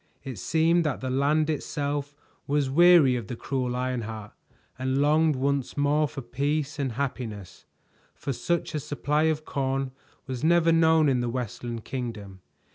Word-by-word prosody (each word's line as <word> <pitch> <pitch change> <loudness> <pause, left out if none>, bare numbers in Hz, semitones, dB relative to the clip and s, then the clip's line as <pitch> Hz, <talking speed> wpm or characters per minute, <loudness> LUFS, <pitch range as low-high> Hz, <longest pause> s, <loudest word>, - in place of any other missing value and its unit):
It 130 -7 -6
seemed 165 - +2
that 150 -4 -1
the 130 -1 -3
land 145 +4 +2
itself 145 -1 -3 0.3
was 140 -2 +1
weary 170 -4 +6
of 120 -5 -4
the 120 - -5
cruel 125 0 -2
Ironheart 115 -4 -4 0.5
and 130 +1 0
longed 150 +2 +3
once 140 +1 -1
more 145 +1 +2
for 135 - -8
peace 145 +4 -2
and 135 -4 -1
happiness, 110 -8 -5 0.5
for 140 - -4
such 170 +6 -2
a 155 - -1
supply 150 +2 0
of 155 -1 0
corn 135 -1 -2 0.3
was 130 -1 -5
never 170 0 +4
known 160 -1 +4
in 130 -3 +2
the 120 0 -1
Westland 120 -1 -5
Kingdom. 105 -7 -6
140 Hz, 155 wpm, -26 LUFS, 125-150 Hz, 0.5 s, weary